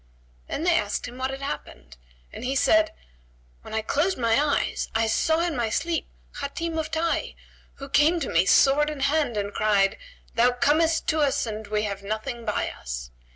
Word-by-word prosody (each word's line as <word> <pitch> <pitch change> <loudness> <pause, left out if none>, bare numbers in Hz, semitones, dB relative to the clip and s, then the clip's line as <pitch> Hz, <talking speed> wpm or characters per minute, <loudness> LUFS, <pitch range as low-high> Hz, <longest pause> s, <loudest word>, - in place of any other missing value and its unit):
Then 310 - -3
they 350 0 +4
asked 205 +3 -3
him 245 +1 -10
what 260 0 -1
had 270 +1 -6
happened 65 - -6 0.4
and - - -8
he 265 +2 -1
said, 320 +3 +4 0.7
"When - - -11
I 220 - 0
closed 330 - +1
my 230 +3 +2
eyes, 290 -1 0
I 225 0 +3
saw 320 +9 +2
in 340 -3 -1
my 235 -3 0
sleep 330 +8 -1 0.3
Hatim 325 +3 -3
of 315 0 -3
Tayy 330 +1 -1 0.4
who 275 - -8
came 310 +5 +3
to 275 - -2
me 170 +2 +2
sword 295 +2 +5
in 300 -2 -6
hand 275 -4 +1
and 205 0 -2
cried, 200 -2 +2 0.3
'Thou 245 +2 +4
comest 315 +5 +2
to 315 - +1
us 285 -4 +2
and 215 -1 -6
we 210 0 0
have 200 -2 -3
nothing 220 +4 -4
by 210 - -1
us.' - - -7
270 Hz, 190 wpm, -25 LUFS, 215-310 Hz, 0.7 s, sword